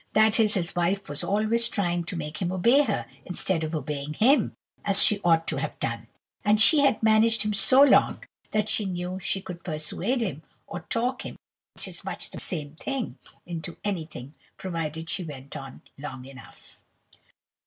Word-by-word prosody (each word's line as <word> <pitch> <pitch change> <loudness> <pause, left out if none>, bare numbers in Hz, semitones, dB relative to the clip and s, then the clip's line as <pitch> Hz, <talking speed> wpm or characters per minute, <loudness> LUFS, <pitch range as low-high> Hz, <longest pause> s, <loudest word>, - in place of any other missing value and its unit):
That 220 +1 +4
is, 215 -1 +3
his 175 -3 -2
wife 190 +3 0
was 145 0 -2
always 220 +3 +2
trying 175 -6 -1
to 180 - -4
make 150 -2 -5
him 180 -1 -1
obey 235 +10 +4
her, 215 - -2 0.2
instead 180 -2 0
of 155 +1 -3
obeying 150 0 -4
him, 265 - +3 0.3
as 200 -1 +7
she 210 -1 +2
ought 165 -1 +3
to - - -2
have - - -4
done; - - -4 0.4
and 210 +1 +3
she 295 +7 +7
had 275 -6 +2
managed 220 +1 +4
him 210 0 -1
so 255 +7 +6
long, 285 - +4 0.3
that 210 0 0
she 215 - 0
knew 180 0 -4
she 190 +1 -2
could 180 -2 -9
persuade 180 +9 -2
him, 160 -9 -3 0.2
or - - -6
talk 250 +3 -2
him - - -7 0.4
(which - - -6
is - - -6
much - - -6
the - - -8
same 155 -3 -4
thing) 245 - -4 0.3
into 170 0 -6
anything, 160 -8 -5 0.2
provided 165 -4 -4
she 185 +2 -2
went 140 -3 -9
on 135 -2 -9 0.2
long 135 -3 -7
enough. 135 -1 -14
185 Hz, 180 wpm, -26 LUFS, 155-215 Hz, 0.4 s, as